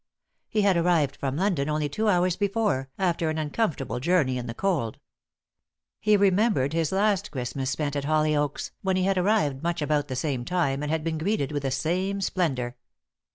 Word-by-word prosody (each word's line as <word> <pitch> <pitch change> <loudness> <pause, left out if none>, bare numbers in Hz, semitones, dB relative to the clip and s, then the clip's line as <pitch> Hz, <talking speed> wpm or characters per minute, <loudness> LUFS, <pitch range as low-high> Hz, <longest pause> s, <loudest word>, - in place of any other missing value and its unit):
He 215 -1 +1
had 195 -3 +4
arrived 165 -5 +2
from 135 -1 -3
London 170 -6 0
only 150 -1 0
two 215 +10 -2
hours 180 -2 +2
before, 200 -10 0
after 170 -4 0
an 155 - -2
uncomfortable 150 - -1
journey 145 -3 +2
in 125 - -6
the 115 - -5
cold. 165 - -1 1.0
He 210 -1 +4
remembered 195 - +2
his 165 -2 0
last 200 0 +1
Christmas 130 0 -3
spent 145 +1 -2
at 140 -1 -2
Hollyoaks, 150 -1 0
when 190 -1 0
he 185 - +1
had 195 0 +2
arrived 180 -9 +1
much 170 0 -1
about 150 -1 0
the 130 - -4
same 130 -2 -2
time 140 -3 0
and 150 0 -2
had 160 -1 0
been 160 -1 -2
greeted 160 -5 0
with 145 -1 -2
the 135 - -1
same 185 +8 -1
splendour. 135 -11 -1
160 Hz, 185 wpm, -26 LUFS, 140-190 Hz, 1.0 s, had